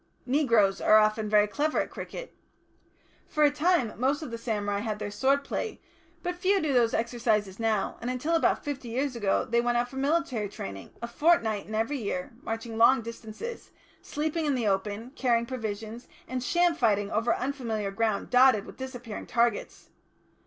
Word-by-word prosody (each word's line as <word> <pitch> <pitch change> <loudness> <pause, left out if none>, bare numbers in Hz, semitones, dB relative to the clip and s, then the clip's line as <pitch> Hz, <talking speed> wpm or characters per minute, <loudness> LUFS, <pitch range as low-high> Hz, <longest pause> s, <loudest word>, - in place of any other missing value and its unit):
Negroes 235 -8 +3
are 215 - +6
often 215 0 +2
very 210 0 +5
clever 295 +8 0
at - - -2
cricket. - - -7 0.9
For 305 - +1
a 290 - +6
time, 300 -6 +1
most 275 +5 +1
of 255 - -7
the 230 - -4
samurai 205 -3 -1
had 215 0 -3
their 210 -1 -5
sword 270 +6 +2
play, 440 - -4 0.4
but 355 - -1
few 375 +3 +2
do 310 -5 0
those 235 -3 +3
exercises 225 -4 0
now, 220 -3 0
and 240 - -3
until 255 +6 -1
about 330 - +2
fifty 280 -4 -4
years 260 +3 -1
ago 205 -4 +1
they 235 +1 +2
went 240 0 +1
out 240 0 +1
for 265 - -9
military 275 -7 0
training, 95 - -7
a - - -2
fortnight 235 -7 +2
in 215 - -5
every 230 +6 0
year, 270 +6 -3
marching 225 -1 -5
long 250 +1 +6
distances, 230 - -7 0.3
sleeping 310 +1 -2
in 285 - +2
the 240 -3 -1
open, 205 +4 -1
carrying 235 -4 +1
provisions, 225 -1 -5 0.2
and 255 0 -3
sham 345 +5 +3
fighting 210 -8 +1
over 225 +2 +1
unfamiliar 235 -6 -3
ground 215 0 -1
dotted 250 -4 +5
with - - -12
disappearing 245 -4 -7
targets. 235 -2 -1
235 Hz, 175 wpm, -28 LUFS, 215-275 Hz, 0.9 s, are